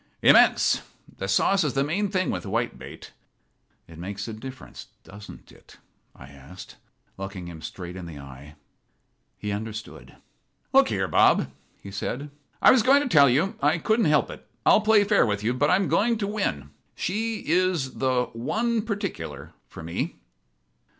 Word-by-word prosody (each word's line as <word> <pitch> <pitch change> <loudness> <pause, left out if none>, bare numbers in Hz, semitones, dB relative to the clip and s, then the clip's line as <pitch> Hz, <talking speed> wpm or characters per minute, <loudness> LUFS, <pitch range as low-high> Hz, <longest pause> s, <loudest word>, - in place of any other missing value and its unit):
"Immense. - - +5 0.4
The 95 - -3
sauce 190 - +2
is 150 - -1
the 135 - +2
main 190 +8 -1
thing 185 0 0
with - - -4
whitebait." 115 +3 -5 0.8
"It 85 -1 -13
makes 100 +3 -6
a 110 - -6
difference, 130 +4 -10 0.2
doesn't 105 +1 -13
it?" - - -19 0.4
I 65 - -13
asked, 70 +6 -13 0.4
looking 95 -2 -6
him 80 -2 -10
straight 90 0 -8
in 90 -2 -8
the 80 -3 -9
eye. 70 +2 -12 0.8
He 105 - -4
understood. 110 +1 -7 0.6
"Look - - +5
here, - - -1
Bob," 65 - +3 0.3
he 100 - -9
said, 135 +8 -5 0.3
"I - - +9
was 255 - +5
going 275 +5 +4
to 255 - -3
tell 140 - +6
you. 150 +11 +1
I 150 +4 +3
couldn't 220 +5 +1
help 150 -1 +2
it. - - -12 0.2
I'll - - +6
play 215 -1 +4
fair 205 0 +3
with 105 -2 -1
you, 115 +3 +1
but 145 +3 +1
I'm 195 0 +2
going 235 +4 +2
in - - -1
to 210 - -2
win. 190 - -3 0.2
She 220 +4 -3
is 170 -5 0
the 130 -2 0
'one 220 - -1
particular' 80 - -5
for - - -11
me." 85 +1 -4
130 Hz, 165 wpm, -25 LUFS, -, 0.8 s, I